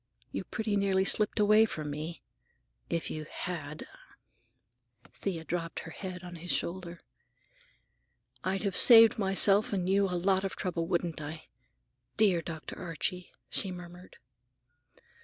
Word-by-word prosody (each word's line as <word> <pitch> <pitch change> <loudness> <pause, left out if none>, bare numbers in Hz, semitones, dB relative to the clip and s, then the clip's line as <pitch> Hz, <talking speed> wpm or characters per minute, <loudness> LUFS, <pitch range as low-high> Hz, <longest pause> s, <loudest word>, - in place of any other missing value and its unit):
You - - -5
pretty 220 -2 -3
nearly 195 -1 +1
slipped 210 +2 +2
away 215 +1 +5
from 155 -8 -5
me. 155 +3 -6 0.7
If 170 -1 -2
you 155 -1 -6
had—" 155 -4 -6 1.3
Thea 175 -5 -4
dropped 165 0 -4
her - - -10
head 185 -2 -7
on 175 -1 -9
his 175 +2 -9
shoulder. 175 -1 -3 1.4
"I'd 190 +2 -2
have 195 -3 -1
saved 225 -2 +8
myself 195 +1 +5
and 185 -3 -1
you 195 +1 +3
a 180 -2 -2
lot 190 +2 +1
of 195 - -3
trouble, 170 -3 -3
wouldn't 170 -3 -2
I? 155 +2 -8 0.7
Dear 195 -6 +3
Dr. 160 -1 -8
Archie!" 180 +1 -4 0.2
she 195 - -3
murmured. 180 0 -11
180 Hz, 135 wpm, -30 LUFS, 170-195 Hz, 1.4 s, saved